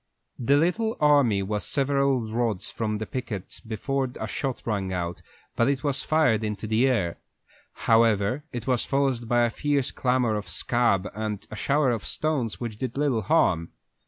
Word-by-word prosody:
The 135 Hz, +3 st, +3 dB
little 215 Hz, +8 st, +1 dB
army 140 Hz, -10 st, +4 dB
was 105 Hz, +1 st, -1 dB
several 140 Hz, -2 st, +2 dB
rods 110 Hz, -3 st, -2 dB
from 110 Hz, -2 st, -2 dB
the 110 Hz, -, -4 dB
pickets 105 Hz, -6 st, -6 dB
before 130 Hz, +4 st, -2 dB
a -, -, -2 dB
shot 130 Hz, +3 st, -3 dB
rang 100 Hz, -4 st, -1 dB
out, 90 Hz, -1 st, -3 dB, 0.3 s
but 115 Hz, -, +3 dB
that 135 Hz, 0 st, 0 dB
was 140 Hz, -3 st, 0 dB
fired 150 Hz, -9 st, +2 dB
into 105 Hz, 0 st, -3 dB
the 110 Hz, +4 st, +2 dB
air. 100 Hz, -10 st, 0 dB, 0.7 s
However, 115 Hz, +3 st, +3 dB
it 120 Hz, -3 st, -5 dB
was 125 Hz, -3 st, +1 dB
followed 135 Hz, -4 st, 0 dB
by 120 Hz, 0 st, +3 dB
a 120 Hz, -1 st, +2 dB
fierce 145 Hz, 0 st, 0 dB
clamor 125 Hz, -3 st, +1 dB
of 105 Hz, -1 st, -4 dB
"Scab" 115 Hz, -6 st, +1 dB
and 105 Hz, -1 st, -4 dB
a -, -, -5 dB
shower 140 Hz, +4 st, +2 dB
of 115 Hz, -3 st, -2 dB
stones, 140 Hz, -8 st, -1 dB
which 115 Hz, -3 st, -5 dB
did 130 Hz, -1 st, -4 dB
little 140 Hz, -6 st, +1 dB
harm. 85 Hz, -3 st, +2 dB
120 Hz, 170 wpm, -26 LUFS, 105-135 Hz, 0.7 s, army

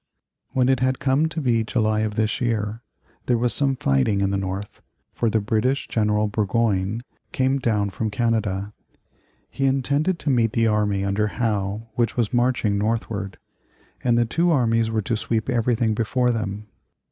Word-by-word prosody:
When 125 Hz, -1 st, +1 dB
it 130 Hz, -1 st, +3 dB
had 130 Hz, 0 st, +1 dB
come 140 Hz, +4 st, +1 dB
to 160 Hz, -, -4 dB
be 120 Hz, -6 st, +1 dB
July 110 Hz, -1 st, 0 dB
of 110 Hz, -1 st, -1 dB
this 110 Hz, +2 st, 0 dB
year, 110 Hz, -2 st, -1 dB, 0.5 s
there 120 Hz, -, +3 dB
was 120 Hz, +1 st, +2 dB
some 135 Hz, -2 st, +2 dB
fighting 70 Hz, -, +1 dB
in 100 Hz, 0 st, +1 dB
the -, -, 0 dB
North, 95 Hz, +1 st, -5 dB, 0.3 s
for 115 Hz, -, 0 dB
the 110 Hz, -, +2 dB
British 110 Hz, +6 st, 0 dB
General 105 Hz, -1 st, +1 dB
Burgoyne 105 Hz, 0 st, 0 dB, 0.3 s
came 130 Hz, +1 st, +1 dB
down 105 Hz, -5 st, 0 dB
from 110 Hz, +3 st, -2 dB
Canada. 105 Hz, -3 st, -1 dB, 0.8 s
He 135 Hz, -, -1 dB
intended 140 Hz, +6 st, +1 dB
to 150 Hz, -, -1 dB
meet 115 Hz, -3 st, +2 dB
the 115 Hz, -, +2 dB
army 105 Hz, -3 st, +1 dB
under 100 Hz, +2 st, +1 dB
Howe 105 Hz, -1 st, -2 dB
which 120 Hz, +1 st, 0 dB
was 115 Hz, -2 st, 0 dB
marching 120 Hz, -4 st, +1 dB
northward, 105 Hz, -3 st, -2 dB, 0.7 s
and 120 Hz, -2 st, +3 dB
the 120 Hz, -, +3 dB
two 170 Hz, +9 st, +1 dB
armies 115 Hz, -7 st, +2 dB
were 110 Hz, -1 st, -1 dB
to 115 Hz, -, -1 dB
sweep 110 Hz, 0 st, -2 dB
everything 115 Hz, -1 st, +1 dB
before 125 Hz, +3 st, +1 dB
them. 105 Hz, -2 st, -3 dB
115 Hz, 170 wpm, -23 LUFS, 105-125 Hz, 0.8 s, it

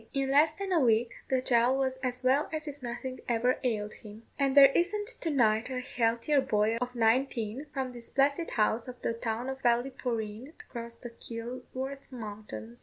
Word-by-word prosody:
In 270 Hz, -1 st, 0 dB
less 300 Hz, +3 st, +5 dB
than 390 Hz, +3 st, -5 dB
a 350 Hz, -, +4 dB
week 235 Hz, -3 st, +3 dB, 0.2 s
the 260 Hz, -1 st, +1 dB
child 245 Hz, +1 st, +3 dB
was 260 Hz, -1 st, 0 dB
as 255 Hz, -1 st, -2 dB
well 270 Hz, +4 st, +3 dB
as 310 Hz, -1 st, -4 dB
if 290 Hz, -1 st, -7 dB
nothing 255 Hz, +2 st, -5 dB
ever 240 Hz, +2 st, +2 dB
ailed 215 Hz, -4 st, -1 dB
him; 215 Hz, +1 st, -12 dB, 0.2 s
and 275 Hz, 0 st, +2 dB
there 275 Hz, -1 st, +10 dB
isn't 415 Hz, +4 st, +1 dB
to 330 Hz, -, 0 dB
night 230 Hz, -5 st, +2 dB
a 255 Hz, -1 st, -2 dB
healthier 250 Hz, +3 st, +1 dB
boy 220 Hz, -3 st, +1 dB
of 250 Hz, +1 st, -4 dB
nineteen, 235 Hz, +2 st, +1 dB
from 265 Hz, -3 st, -3 dB
this 235 Hz, -1 st, -6 dB
blessed 280 Hz, +4 st, +1 dB
house 220 Hz, +1 st, +2 dB
to 250 Hz, -1 st, -7 dB
the -, -, -1 dB
town 230 Hz, +1 st, -3 dB
of 265 Hz, 0 st, -5 dB
Ballyporeen, 240 Hz, 0 st, -1 dB
across 235 Hz, -1 st, -8 dB
the 240 Hz, 0 st, -9 dB
Kilworth 255 Hz, +4 st, -7 dB
mountains." 205 Hz, -, -7 dB
250 Hz, 180 wpm, -30 LUFS, 230-270 Hz, 0.2 s, there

